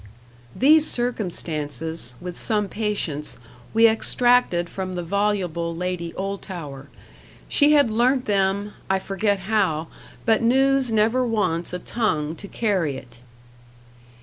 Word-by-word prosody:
These 310 +4 +5
circumstances, 165 - -1
with 180 -1 -7
some 210 -2 0
patience, 200 -9 -3 0.3
we 225 +1 +6
extracted 225 -5 +2
from 185 0 -5
the 175 - -3
voluble 180 -3 -1
Lady 180 -1 -3
Oldtower. 175 -8 -6 0.6
She 295 0 +4
had 285 -6 +4
learnt 250 +4 +2
them 200 -1 0 0.2
I 190 - +3
forget 195 +1 -1
how: 190 -6 0 0.4
but 225 0 +3
news 265 +1 +2
never 225 +4 +2
wants 205 -8 -1
a 180 - -3
tongue 160 -7 -2
to 200 - -9
carry 185 - -1
it. 120 -2 -13
195 Hz, 120 wpm, -23 LUFS, 170-225 Hz, 0.6 s, we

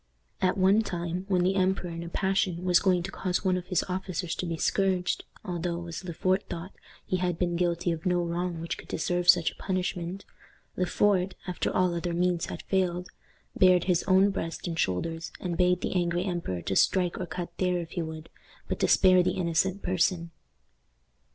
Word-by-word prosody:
At 185 0 +2
one 195 +3 +5
time, 175 -2 -3
when 185 -3 +2
the 185 +2 +2
emperor 185 -2 +1
in 165 0 -5
a 170 - -6
passion, 190 -1 0
was 180 -1 +5
going 180 -3 +2
to 195 - -5
cause 185 0 -2
one 185 -1 +3
of 180 -1 -4
his 180 - +1
officers 185 -2 -3
to 180 - -3
be 165 -1 -2
scourged, 185 0 0 0.2
although, 175 -2 -3
as 170 +1 -6
Le 180 - -5
Fort 185 +3 +1
thought, 170 +3 -6 0.3
he 185 - 0
had 180 -2 -1
been 175 -1 0
guilty 175 0 0
of 165 -1 -4
no 180 -1 +1
wrong 170 0 -2
which 165 +1 -4
could - - -11
deserve 175 +2 -1
such 175 -2 +6
a - - -18
punishment, 185 0 -3 0.5
Le 180 - 0
Fort, 190 -1 +2
after 180 -1 -2
all 185 -1 +2
other 170 0 -2
means 175 -1 +1
had - - -7
failed, 180 -2 0 0.5
bared 180 -2 +5
his 180 -2 +2
own 190 +1 +5
breast 165 -4 -4
and 165 -1 -3
shoulders, 165 - -1
and 175 -2 -3
bade 180 0 +2
the - - -2
angry 175 -1 +1
emperor 170 - -3
to 95 - -2
strike 180 - +2
or 180 - -3
cut 175 0 -5
there 180 -1 +2
if 170 -2 -5
he 175 - -2
would, 160 0 -6 0.4
but - - -3
to - - +2
spare 185 -1 +6
the 180 - +1
innocent 180 +2 0
person. 175 -1 0
180 Hz, 200 wpm, -28 LUFS, 170-185 Hz, 0.5 s, such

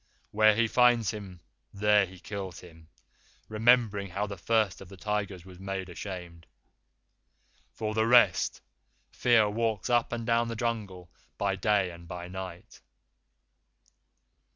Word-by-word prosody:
Where 110 0 +5
he 115 +1 +2
finds 120 -2 +3
him, 100 -5 -9 0.3
there 105 0 +3
he 95 0 -14
kills 95 -2 -7
him, 80 -2 -15 0.6
remembering 110 -3 +2
how 100 +4 -2
the 100 -1 -6
First 110 +1 0
of 95 - -11
the 95 - -12
Tigers 100 -3 -3
was 90 -1 -13
made 95 -1 -5
ashamed. 90 -2 -8 1.2
For 110 -1 -4
the 110 +1 +1
rest, 115 -7 +4 0.5
Fear 115 -4 +3
walks 110 0 -1
up 120 -1 +2
and 115 -1 -4
down 115 0 +2
the 115 - -4
Jungle 105 -7 -4 0.3
by 100 -1 0
day 95 -1 +1
and 85 0 -13
by 90 0 -7
night." 95 -2 -9
100 Hz, 135 wpm, -29 LUFS, 95-110 Hz, 1.2 s, Where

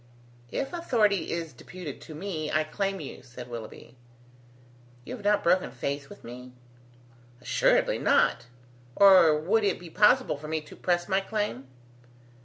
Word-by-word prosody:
"If 275 - -3
authority 215 - +1
is 165 -3 -4
deputed 155 +3 -9
to 155 - -10
me, 160 -3 -4
I 155 - +2
claim 195 +5 -2
you," 145 - -8
said 125 -1 -11
Willoughby. 120 0 -9 1.1
"You - - -6
have 220 - -12
not 205 0 +2
broken 180 +2 +2
faith 140 +2 -4
with - - -13
me?" 125 +1 -10 0.9
"Assuredly 125 - +2
not, - - +2 0.5
or 185 -6 +7
would 210 +8 +1
it 200 -2 +1
be 175 -2 -11
possible 210 - +4
for 150 +2 -9
me 160 +1 -1
to 150 - -14
press 175 -1 0
my 190 0 +2
claim?" 195 - -3
170 Hz, 150 wpm, -27 LUFS, 140-200 Hz, 1.1 s, or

